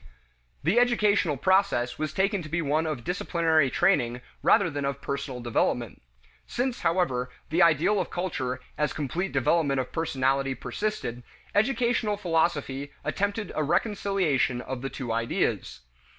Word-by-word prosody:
The 180 +11 +3
educational 210 - +3
process 160 -9 +2
was 155 -1 -1
taken 195 +3 +1
to 155 - -8
be 165 - -1
one 155 +1 +1
of 145 -7 -3
disciplinary 165 -3 +1
training 125 -9 +2 0.2
rather 200 - +4
than 145 -3 -3
of 140 0 -2
personal 140 -2 -4
development. 120 -1 -1 0.5
Since, 250 0 -2
however, 150 -8 +1 0.2
the 170 +3 +3
ideal 170 +5 +4
of 180 - -4
culture 130 -8 -3 0.2
as 150 -2 +1
complete 165 +6 -2
development 140 +1 +2
of 130 - -3
personality 135 -4 0
persisted, 125 - -3 0.3
educational 230 -1 +1
philosophy 160 -6 0
attempted 205 +2 -2
a 155 - 0
reconciliation 175 - +1
of 130 0 -5
the 135 - -3
two 125 -4 -5
ideas. 115 - -1
155 Hz, 135 wpm, -27 LUFS, 135-190 Hz, 0.5 s, rather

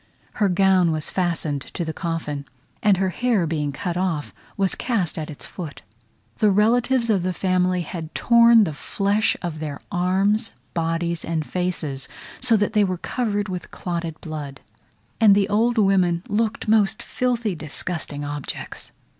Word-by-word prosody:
Her 205 - +4
gown 185 -2 +4
was 155 -1 -2
fastened 165 -6 -1
to 170 +4 -5
the 160 - -3
coffin, 160 -5 -3 0.4
and 205 -3 +4
her 190 0 +1
hair 220 0 +1
being 150 -3 -1
cut 175 +5 -3
off 175 -5 -1 0.2
was 195 -2 +2
cast 205 -10 -1
at 155 -1 -4
its 150 - -6
foot. 165 -6 -8 0.6
The 215 - +5
relatives 230 +4 +3
of 195 -4 +2
the 185 +1 -1
family 185 0 +1
had 165 -1 -7
torn 235 -1 +6
the 160 -6 -1
flesh 200 +7 0
of 165 -3 -4
their 150 -2 -5
arms, 195 +5 +1 0.2
bodies, 165 0 -1
and 160 -2 -2
faces, 160 -7 -3 0.3
so 240 -3 +4
that 205 +1 0
they 210 -2 +4
were 185 -2 0
covered 205 0 -2
with 180 -2 -5
clotted 170 -3 -4
blood; 145 -4 -6 0.6
and 210 -3 +7
the 200 -1 +3
old 230 +3 +2
women 185 -4 +3
looked 220 +1 -1
most 215 -2 +3
filthy, 240 -4 -1
disgusting 155 -1 -4
objects. 145 -1 -6
180 Hz, 155 wpm, -23 LUFS, 160-210 Hz, 0.6 s, and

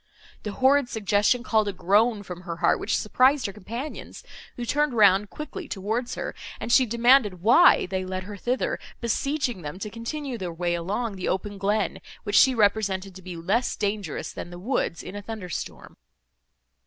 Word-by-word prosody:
The 210 - -5
horrid 265 +1 +3
suggestion 210 +3 +1
called 220 -4 +2
a 200 - -2
groan 205 +4 +2
from 180 -2 -8
her 170 -2 -5
heart, 165 - +2
which - - 0
surprised 260 +5 +3
her 200 - -3
companions, 230 +9 -7 0.3
who 240 - -5
turned 295 +1 +1
round 200 -2 +5
quickly 305 +3 -7
towards 225 +5 -3
her, - - -4 0.3
and 235 - -4
she 255 +1 +5
demanded 235 -5 +3
why 245 - +6
they 185 0 -3
led 185 0 -4
her 205 +2 -8
thither, 245 +6 -1 0.2
beseeching 250 -1 -1
them 150 +2 -6
to 205 +2 -6
continue 245 +3 -5
their 180 -2 -4
way 175 +1 -1
along 195 +5 -2
the 185 - -2
open 200 +2 -3
glen, 205 +1 0 0.2
which 205 - -2
she 260 -1 +6
represented 200 -3 +1
to 190 - -11
be 180 -1 -8
less 200 +9 0
dangerous 200 -5 -3
than - - -7
the 175 - -9
woods, 190 -4 -2
in 195 - -8
a 205 - -5
thunder 205 -3 -7
storm. - - -6
210 Hz, 180 wpm, -25 LUFS, 190-245 Hz, 0.3 s, why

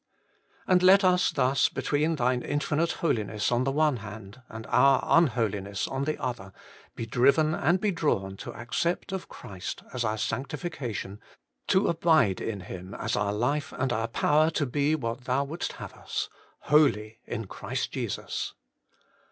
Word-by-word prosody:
And 180 -1 +4
let 190 +2 +7
us 180 -1 +4
thus, 135 -1 +2
between 155 +3 0
Thine 125 -2 +1
infinite 150 +4 0
Holiness 110 -9 0
on 120 +1 +2
the 135 - +1
one 150 -2 +2
hand 105 +2 -10
and 110 0 -8
our 140 -1 +5
unholiness 105 - +1
on 135 +1 -2
the 155 - -1
other, 110 -7 -4 0.4
be 115 - -4
driven 140 +7 +3
and 170 +6 +2
be 210 +1 +1
drawn 100 - -1
to - - -7
accept 170 +11 -2
of 190 -1 -5
Christ 95 -2 -7
as 125 -2 -1
our 110 -1 -1
sanctification, 125 - -4 0.5
to 190 - +3
abide 160 - +3
in 105 -4 -3
Him 90 +1 -8
as - - -2
our 105 -1 0
life 140 +8 -1
and 130 -1 -1
our 115 0 -1
power 150 +6 +3
to 155 -2 0
be 145 +4 +1
what 125 -3 -4
Thou 130 +2 +1
wouldst 155 +5 -4
have - - -9
us - - -4 0.2
' - - -34
Holy 115 -8 +3
in 115 -2 -4
Christ - - -4
Jesus.' - - -4
130 Hz, 160 wpm, -27 LUFS, 110-155 Hz, 0.5 s, let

